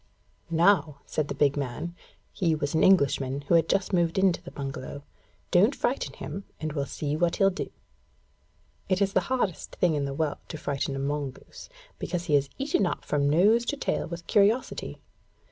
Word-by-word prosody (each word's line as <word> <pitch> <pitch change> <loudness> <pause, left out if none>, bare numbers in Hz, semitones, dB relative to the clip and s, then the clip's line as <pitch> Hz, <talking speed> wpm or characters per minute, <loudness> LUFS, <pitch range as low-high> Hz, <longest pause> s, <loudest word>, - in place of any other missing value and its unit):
'Now,' 165 -3 +3
said 155 -2 -2
the - - -4
big 145 -1 +3
man 145 +5 -4 0.4
(he 165 -4 +1
was 145 -2 -2
an 160 - +3
Englishman 140 -6 +3
who 145 +4 -1
had 165 -1 +4
just 195 0 +1
moved 170 -1 +2
into 190 -3 +3
the 175 - -9
bungalow); 140 0 -6 0.5
'don't 205 +10 +4
frighten 265 - -1
him 195 - -6
and 155 -1 -3
we'll 140 -2 -2
see 150 -1 -3
what 170 +1 +1
he'll 195 -1 +4
do.' 190 - -4 1.2
It 185 -1 +2
is 200 -1 +1
the - - +5
hardest 250 -10 -1
thing 175 -3 +2
in 145 -2 0
the 135 0 -4
world 155 -1 -1
to - - -6
frighten 140 -1 -2
a - - -4
mongoose, 140 - -5 0.3
because 175 -1 -3
he 150 - +2
is 140 -1 +2
eaten 275 -8 +1
up - - -4
from 145 -1 +1
nose 205 +10 +4
to 290 - -2
tail - - -1
with 170 0 -7
curiosity. 210 +5 +1
165 Hz, 185 wpm, -27 LUFS, 145-190 Hz, 1.2 s, the